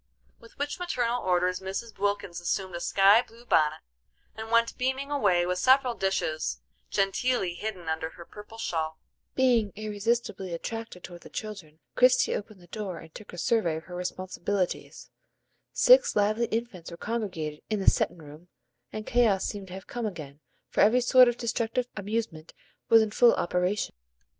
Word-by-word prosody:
With 230 - -18
which 290 +4 -3
maternal 245 -9 -1
orders 180 0 +1
Mrs. 195 +3 -6
Wilkins 200 -4 -1
assumed 185 +1 -2
a 175 - -4
sky 195 +5 +5
blue 235 0 -17
bonnet, 155 -7 +2 0.5
and 220 0 -7
went 230 0 +3
beaming 265 +2 -2
away 195 -11 +2
with 180 0 -1
several 260 +2 +4
dishes 190 -7 -1 0.3
genteelly 195 0 0
hidden 185 -2 -6
under 160 0 -2
her 170 +1 -12
purple 210 +4 -12
shawl. 160 -7 -2 0.4
Being 240 -6 +3
irresistibly 210 -3 -2
attracted 225 0 -6
toward 175 -1 -10
the - - -13
children 195 -8 -7 0.2
Christie 255 0 +4
opened 205 -2 -7
the - - -15
door 190 -1 -5
and 160 0 -12
took 210 - -11
a 175 - -10
survey 175 -4 +1
of 160 - -6
her 180 +1 -9
responsibilities. 185 +1 -3 0.6
Six - - +5
lively 215 +3 +2
infants 220 -7 -4
were 170 - -9
congregated 180 -9 -4
in 215 -2 0
the 190 - -4
"settin' - - +3
room," 150 +4 -13 0.4
and 215 0 -6
chaos 225 -6 +2
seemed 200 -2 -5
to 180 - -10
have 190 0 -8
come 240 -2 -3
again, 150 -7 -8 0.3
for - - 0
every 240 +4 +5
sort 250 +1 +7
of 240 0 0
destructive 235 +1 -1
amusement 205 -6 -4 0.3
was 225 -1 +7
in 215 - -3
full 240 +2 +5
operation. 180 +4 -1
205 Hz, 165 wpm, -28 LUFS, 175-230 Hz, 0.6 s, sort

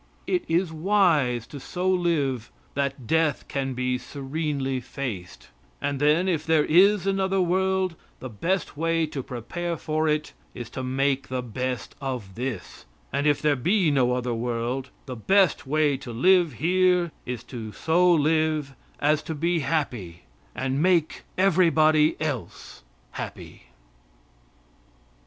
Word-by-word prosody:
It 360 -2 0
is 165 0 +1
wise 155 - +2
to 145 - -9
so 180 +7 -3
live 160 -10 0 0.2
that 140 -2 -2
death 160 +2 +1
can 135 -2 -2
be 125 0 -1
serenely 140 0 -3
faced, 120 -8 -6 0.3
and 140 -1 -2
then, 150 +5 +3
if 165 -5 0
there 160 -2 +3
is 195 +3 +5
another 195 0 +1
world, 185 0 +1 0.2
the 130 - -6
best 165 - -2
way 165 +1 +1
to 150 -3 -5
prepare 165 +8 -4
for 155 0 -1
it 150 0 0 0.2
is 120 -2 -7
to 130 - -5
make 135 +1 0
the 130 -1 -3
best 125 +2 -4
of 125 -8 -4
this; 120 -4 -6 0.3
and 140 +2 +1
if 145 0 +2
there 150 -1 +3
be 175 - +2
no 125 -3 +2
other 125 -1 -1
world, 120 +3 -2 0.2
the 130 - -6
best 185 - +2
way 150 -1 +2
to 130 -2 -8
live 175 +6 +4
here 180 0 +2 0.2
is 125 -2 -4
to 115 -4 -7
so 175 +8 +3
live 155 -2 +2 0.3
as 150 +1 +2
to 160 - -5
be 170 +3 +1
happy 125 - -2 0.3
and 135 +2 -1
make 175 -3 +1
everybody 160 -5 +4
else 145 -7 -5 0.3
happy. - - -8
150 Hz, 140 wpm, -25 LUFS, 130-170 Hz, 0.3 s, is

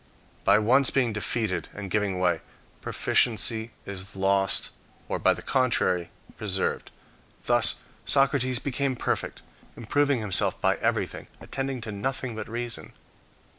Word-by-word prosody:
By 100 +1 +5
once 125 +6 +4
being 125 -5 +1
defeated 105 -1 -1
and 100 -2 -6
giving 100 -2 0
way, 90 -3 +1 0.4
proficiency 110 -1 +2 0.2
is 95 -1 -7
lost, 95 0 +2 0.4
or - - -2
by - - +3
the - - -9
contrary 95 -9 +1 0.3
preserved. 95 -3 -1 0.6
Thus - - +3 0.2
Socrates 135 -2 +2
became 135 +1 -1
perfect, - - -2 0.3
improving 140 +3 +1
himself 105 -4 +2
by - - +2
everything. - - -1
attending 135 -2 -4
to 110 -1 -6
nothing 125 +3 -3
but 110 - -6
reason. 120 0 -4
110 Hz, 125 wpm, -26 LUFS, 100-130 Hz, 0.6 s, By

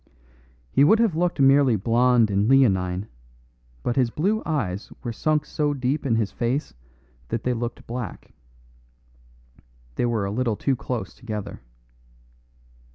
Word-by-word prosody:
He 140 - +4
would 195 +10 +6
have 225 -7 +2
looked 175 -1 0
merely 135 -2 +5
blonde 115 +1 +3
and 100 +3 +1
leonine, 95 -7 +3 0.8
but 120 - -1
his 125 -3 +3
blue 200 - 0
eyes 110 - -2
were 120 -2 -3
sunk 150 +5 0
so 145 -1 -1
deep 135 +2 -1
in 115 - +2
his 110 -3 0
face 125 +5 -2 0.5
that 115 - -3
they 125 - +1
looked 120 0 -5
black. 120 -5 -7 1.6
They 120 - +1
were 115 -4 0
a 100 - -3
little 115 0 0
too 135 +5 0
close 120 0 -5
together. 105 -5 -7
125 Hz, 140 wpm, -24 LUFS, 110-140 Hz, 1.6 s, would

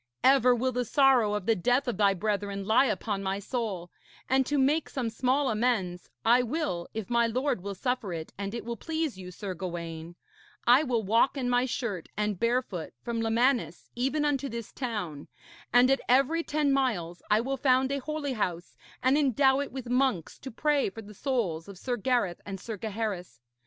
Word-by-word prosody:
Ever 255 -2 +6
will 255 +2 0
the 250 0 -1
sorrow 250 -5 +4
of 205 -3 -3
the 225 - +3
death 245 +8 +1
of 245 - -1
thy 200 -2 +4
brethren 200 0 -2
lie 220 +6 +4
upon 205 -1 -2
my 195 0 -1
soul; 200 -5 -4 0.4
and 265 0 +2
to 295 - 0
make 285 +4 +2
some 245 -4 -2
small 260 +4 +1
amends 210 -6 -1 0.2
I 240 +2 +6
will, 245 - -2
if 220 -3 -4
my 235 -1 +3
lord 255 -2 -1
will 200 +1 -5
suffer 250 -1 -2
it 160 -2 -6
and 200 +2 -4
it 235 - -5
will 235 0 -3
please 315 - -3
you, 180 -1 -8
Sir 190 +1 -6
Gawaine, 170 -2 -6 0.5
I 245 +4 +7
will 245 -7 0
walk 230 +8 +3
in 250 -2 -1
my 245 +1 +3
shirt 220 -9 -3
and 210 -3 -1
barefoot 235 -8 -1
from 235 -1 -2
Lemanis 225 - +1
even 270 +5 0
unto 280 -1 0
this 230 -1 -6
town, 205 - -4 0.4
and 245 +2 +6
at 270 - +2
every 275 +6 +4
ten 300 -3 0
miles 195 -11 0
I 210 0 +4
will 270 +3 -2
found 260 0 +3
a 280 - 0
holy 290 0 -3
house, 180 -6 -3 0.3
and 265 +3 +4
endow 270 -1 +3
it 285 - -3
with 260 -1 -6
monks 250 - 0
to 265 - -7
pray 290 +2 +1
for 225 +3 -10
the 210 +1 -12
souls 200 - -2
of 200 -2 -10
Sir 245 +6 -2
Gareth 235 -6 0
and 195 -1 -6
Sir 220 +3 -5
Gaheris. 205 - -4
235 Hz, 195 wpm, -28 LUFS, 195-265 Hz, 0.5 s, I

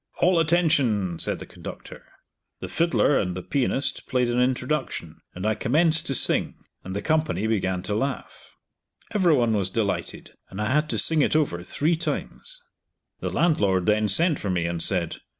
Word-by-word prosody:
"All 180 -1 +3
attention!" 140 - +1
said - - -1
the - - -9
conductor. - - -10 0.6
The - - -6
fiddler 165 -4 +2
and 90 -2 -3
the 90 - -6
pianist 135 0 -1
played 125 -2 0
an 120 +1 +1
introduction, 130 +4 -2
and 90 +3 -5
I 110 - +2
commenced 155 +9 +1
to 135 - -1
sing, - - +2 0.3
and 95 +1 -7
the 100 - -3
company 155 -9 0
began 95 -5 -1
to 105 - -3
laugh. 130 +5 -5 0.6
Every 180 -6 +3
one 120 -4 +1
was 100 -3 0
delighted, 100 0 -3 0.2
and 95 - -9
I 105 +3 -1
had 150 +2 +1
to - - -1
sing 160 -2 +5
it 145 - +1
over 140 - 0
three 155 - 0
times. 485 - -6 0.6
The - - -3
landlord 100 - +1
then 105 +1 +2
sent 155 - +3
for 100 - -4
me 90 -2 0
and 85 -1 -3
said. 85 -2 0
125 Hz, 175 wpm, -24 LUFS, 100-155 Hz, 0.6 s, sing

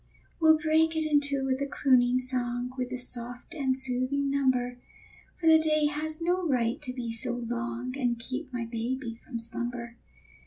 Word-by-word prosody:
We'll 315 -1 +6
break 320 +1 +2
it 315 -1 0
in 300 -1 +4
two 280 -1 0
with 265 0 0
a 280 - 0
crooning 255 -3 +3
song, 250 -1 -1
With 250 -1 -3
a 255 - -2
soft 245 +3 -3
and 265 -5 0
soothing 265 +2 0
number; 250 -3 +1 0.6
For 345 - -5
the 320 0 +8
day 310 -1 +3
has 310 +1 -2
no 355 +2 +1
right 250 0 +1
to 255 - -3
be 245 -2 -4
so 240 +2 0
long 240 +1 -4
And 245 -3 0
keep 260 +4 -5
my 245 -2 -3
baby 235 +2 -3
from 235 +1 -8
slumber. 235 +1 -4
255 Hz, 180 wpm, -28 LUFS, 245-290 Hz, 0.6 s, the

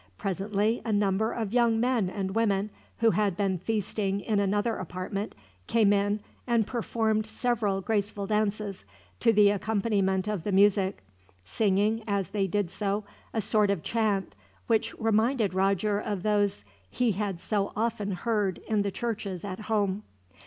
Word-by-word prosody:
Presently 200 - 0
a 225 - -2
number 205 +1 +2
of 220 -3 -3
young 235 -2 +3
men 235 -5 +1
and 190 -1 -3
women, 210 -2 +1 0.3
who 230 -1 +5
had 205 -4 +1
been 195 -3 0
feasting 205 0 -1
in 210 -1 0
another 205 +3 +1
apartment, 185 +3 -4 0.3
came 215 -3 +4
in 205 +1 +1 0.3
and 235 -3 +3
performed 220 -2 0
several 215 -4 0
graceful 205 0 -1
dances, 210 -1 -1 0.4
to - - +4
the 205 -2 +6
accompaniment 200 -2 0
of 210 -6 -2
the 205 - -2
music; 195 - +3 0.4
singing, 210 - +1
as 200 -2 -1
they 200 -2 0
did 195 -2 -1
so, 205 0 -1 0.3
a 225 - -1
sort 210 0 +2
of 195 -6 0
chant, 215 -4 0 0.3
which 225 -2 +1
reminded 225 -1 +2
Roger 195 +2 +1
of 205 -3 -3
those 205 - +1 0.2
he 245 - +1
had 200 -2 -2
so 200 +1 -1
often 215 -2 -1
heard 205 -1 -1
in 215 -2 +2
the 200 - 0
churches 200 -4 -4
at 190 0 -5
home. 205 -2 0
205 Hz, 150 wpm, -28 LUFS, 195-220 Hz, 0.4 s, the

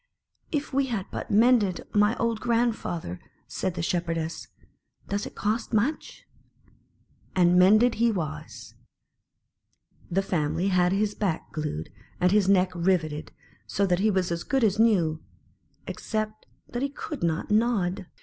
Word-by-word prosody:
"If 295 -2 -2
we 275 0 +2
had 220 -7 -2
but - - -5
mended 215 -3 +3
my 210 +2 +3
old 230 -1 0
grand 235 -1 +1
father!" 160 - -5 0.3
said 185 -2 -3
the 170 - -3
Shepherdess. 165 -2 -2 0.6
"Does 200 +1 -2
it - - -12
cost 220 +3 -2
much?" 245 +9 -1 1.1
And 175 -1 +4
mended 215 +6 +6
he 235 0 +4
was. 165 -8 -6 1.4
The 195 +3 +1
family 175 +1 0
had 180 -1 +3
his 205 +2 +1
back 190 -6 -2
glued, 150 - -4 0.3
and 180 0 +3
his 200 -2 +3
neck 185 -2 +4
riveted, 170 -4 0 0.4
so 200 - +1
that 180 -2 +1
he 215 +3 +3
was 185 -3 0
as 170 0 -2
good 270 -2 0
as 215 -1 +2
new, 175 -9 +3 0.6
except 215 -1 -4 0.2
that 240 - -4
he 280 - 0
could 285 +1 -7
not 165 +3 -1
nod. 210 -5 +1
195 Hz, 145 wpm, -26 LUFS, 175-225 Hz, 1.4 s, mended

